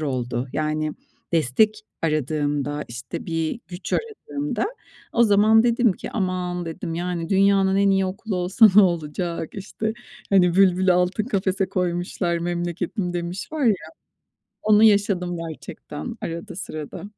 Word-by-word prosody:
oldu. 125 -3 -2
Yani, 155 0 -1 0.4
destek 210 - +2 0.2
aradığımda, 145 -1 -1
işte, 120 +1 -7
bir 165 +5 -2
güç 180 +1 -7
aradığımda 295 - -2 0.5
o 235 - +4
zaman 215 +1 +5
dedim 235 -2 +3
ki - - -8
“Aman!" 180 -3 -2
dedim, 165 0 -5
yani 175 -1 -3
"Dünyanın 195 0 +3
en 200 0 +4
iyi 195 0 +2
okulu 195 +2 -4
olsa 185 +5 +5
ne 210 - +9
olacak?“ 170 -1 -1
İşte, 210 +2 -4 0.4
hani, 180 -3 +4
bülbülü 185 -1 +4
altın 180 +4 +1
kafese 195 -3 0
koymuşlar, 175 -1 -1
"Memleketim." 175 +2 -2
demiş 175 - -4
var 305 -4 -1
ya. 220 - +5 0.9
Onu 215 0 +5
yaşadım 200 -4 +3
gerçekten 160 +6 -7
arada 165 0 -5
sırada. 160 -2 -6
180 Hz, 130 wpm, -23 LUFS, 165-200 Hz, 0.9 s, ne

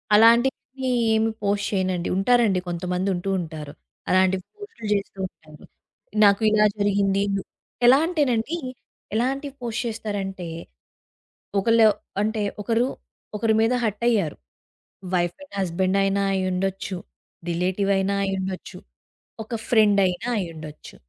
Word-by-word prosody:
అలాంటివి 245 +3 +3 0.3
ఏమి 220 +1 +2
పోస్ట్ 205 0 0
చేయనండి. 185 -2 0
ఉంటారండి. 215 -2 +3
కొంతమందుంటూ 180 +2 -2
ఉంటారు. 155 -3 -7 0.4
అలాంటివి 185 0 +3
పోస్టులు 415 - -9
జేస్తూ 200 -1 -3
ఉంటారు. 155 -3 -18 0.6
నాకు 200 +1 +5
ఇలా 215 0 +4
జరిగింది, 200 -1 +2 0.6
ఎలా 255 +3 +8
అంటేనండి, 295 -3 0 0.6
ఎలాంటివి 270 +4 -1
పోస్ట్ 240 +1 -2
చేస్తారంటే, 200 -5 -4 1.1
ఒకళ్ళు 225 +1 +5 0.3
అంటే 215 0 -1 0.2
ఒకరు 230 +4 +1 0.5
ఒకరి 220 0 +2
మీద 225 +2 +3
హర్ట్ 215 +2 -2
అయ్యారు. 200 -10 +1 0.8
వైఫ్ 175 -1 +1
అండ్ 285 - -16
హస్బెండ్ 185 +1 0
అయినా 195 0 +1
అయ్యుండొచ్చు, 190 +1 -1 0.5
రిలేటివ్ 185 +3 0
అయినా 195 +1 0
అయ్యుండొచ్చు, 190 -1 -4 0.7
ఒక 220 - -19 0.2
ఫ్రెండ్ 210 -3 +5
అయినా 180 +6 -2
అయ్యుండొచ్చు. 155 -4 -8
200 Hz, 110 wpm, -24 LUFS, 185-225 Hz, 1.1 s, ఎలా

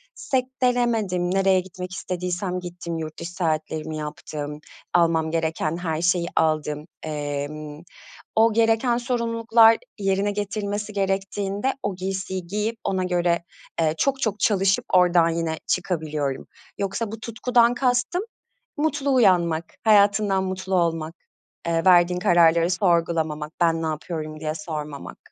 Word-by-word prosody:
sektelemedim, 245 - 0
nereye 195 -1 +4
gitmek 185 0 -7
istediysem 180 0 -3
gittim, 175 -1 -6
yurt 155 -1 -6
dışı 170 +1 -6
seyahatlerimi 155 -2 -2
yaptım, 150 0 -6 0.3
almam 165 -2 +3
gereken 160 0 -1
her 165 -2 -2
şeyi 175 -1 +2
aldım. 155 -1 0 0.2
Emm, 150 0 -5 0.5
o 225 0 +4
gereken 230 +2 +3
sorumluluklar, 230 -2 +3 0.2
yerine 195 +1 +1
getirilmesi 205 0 -3
gerektiğinde 195 +4 -1
o 200 -3 -2
giysiyi 190 -1 -4
giyip, 210 +4 -2
ona 190 -2 0
göre, 175 -1 +1 0.4
eee, 155 -1 +2
çok 275 - 0
çok 210 -2 -1
çalışıp 195 -2 +2
oradan 175 -2 +5
yine 165 -1 -2
çıkabiliyorum. 155 -6 -2 0.3
Yoksa 200 +2 -2
bu 225 - -7
tutkudan 235 +1 +2
kastım; 250 +9 +1 0.5
mutlu 290 -2 0
uyanmak, 175 -8 +3 0.2
hayatından 205 -2 +4
mutlu 185 0 -3
olmak, 165 -2 0 0.5
eee, 165 0 0
verdiğin 180 -1 +5
kararları 170 -2 +4
sorgulamamak, 165 -4 0
"ben 165 -1 +2
ne - - -1
yapıyorum?" 155 0 -4
diye 155 0 -2
sormamak. 150 -6 -6
180 Hz, 120 wpm, -24 LUFS, 160-205 Hz, 0.5 s, oradan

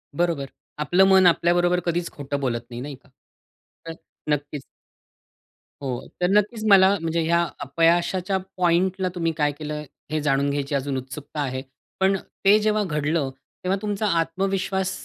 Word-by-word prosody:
बरोबर. 165 -6 0 0.3
आपलं 175 +6 +3
मन 190 -1 +6
आपल्याबरोबर 175 +1 +3
कधीच 170 0 -1
खोटं 145 0 -4
बोलत 120 -3 -2
नाही, 120 +1 -6
नाही 140 +1 -6
का. 135 +1 -25 0.8
तर 165 - -5 0.4
नक्कीच 145 0 -4 1.2
हो. 130 -3 -4
तर 180 - +3
नक्कीच 210 +3 +1
मला 195 0 +6
म्हणजे 165 0 0
या 170 +1 +3 0.2
अपयशाच्या 170 +6 +1 0.2
पॉइंटला 185 +1 +2
तुम्ही 165 -2 0
काय 150 -2 +2
केलं 150 0 -6 0.3
हे 155 0 0
जाणून 140 -1 +1
घ्यायची 140 0 -2
अजून 140 0 -1
उत्सुकता 140 +3 -6
आहे, 130 -2 -2 0.4
पण 190 +1 +3 0.3
ते 200 +2 +7
जेव्हा 215 0 +1
घडलं 150 -4 -1 0.3
तेव्हा 185 +2 +1
तुमचा 210 0 -1
आत्मविश्वास 190 +2 -1
165 Hz, 145 wpm, -24 LUFS, 145-190 Hz, 1.2 s, ते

